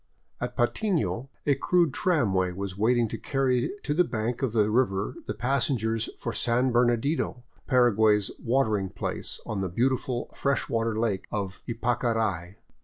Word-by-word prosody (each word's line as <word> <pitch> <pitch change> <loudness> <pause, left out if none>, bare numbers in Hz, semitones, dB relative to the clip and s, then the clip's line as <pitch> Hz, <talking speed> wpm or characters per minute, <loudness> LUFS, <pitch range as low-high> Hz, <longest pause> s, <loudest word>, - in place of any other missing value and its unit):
At - - -4
Patmo 165 - 0 0.2
a 145 - +4
crude 170 +2 +2
tramway 100 - +1
was 95 0 -5
waiting 115 +3 +2
to - - -5
carry 130 -3 +1
to 145 - 0
the 180 +4 +4
bank 115 -3 -3
of 130 -4 0
the 105 -1 +2
river 105 -5 +1
the 105 - -3
passengers 115 -2 0
for 115 - -4
San 125 +2 +1
Bernadino, 120 +2 +1 0.2
Paraguay's 110 -5 +4
" - - -32
watering 110 -6 +1
place," 95 - -4
on 105 - -3
the 95 - -1
beautiful 125 +4 -1
fresh 140 -1 0
water 115 -1 0
lake 110 -5 0
of 95 -3 -4
Ypacarai. 115 -6 -1
115 Hz, 150 wpm, -27 LUFS, 105-130 Hz, 0.2 s, a